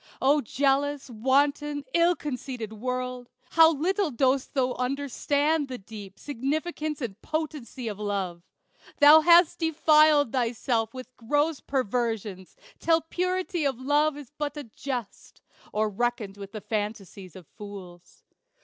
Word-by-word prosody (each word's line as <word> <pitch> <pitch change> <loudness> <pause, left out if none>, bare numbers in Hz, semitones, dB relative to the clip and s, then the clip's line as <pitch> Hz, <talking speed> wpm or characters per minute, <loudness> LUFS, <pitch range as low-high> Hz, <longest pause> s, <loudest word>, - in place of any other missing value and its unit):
O 285 +3 +3
jealous, 280 +2 0
wanton, 285 +5 +1
ill 340 +1 +4
conceited 250 -6 -5
World! 250 +2 -4 0.2
How 325 0 +7
little 360 +5 0
dost 265 +2 0
thou 255 -2 +1
understand 285 +3 0
the 255 -1 -6
deep 200 -2 -11
Significance 300 +3 -3
and 225 -4 -5
potency 300 -6 -4
of 210 -2 -5
Love! 195 -4 -3 0.6
Thou 300 +2 +9
hast 340 +1 +5
defiled 305 -4 +4
thyself 230 -2 0
with 255 0 -9
gross 290 +6 0
perversions, 225 -7 -2 0.2
Till 330 0 +3
purity 365 +1 -2
of 270 -4 -1
love 290 +3 +2
is 290 -3 -11
but 295 0 -4
a 295 - -5
jest, 245 -1 -7 0.3
Or 215 +1 +1
reckoned 215 -1 -2
with 200 -1 -9
the 215 - -6
fantasies 205 -4 -5
of 185 -3 -11
fools. 185 -2 -12
265 Hz, 130 wpm, -27 LUFS, 225-295 Hz, 0.6 s, Thou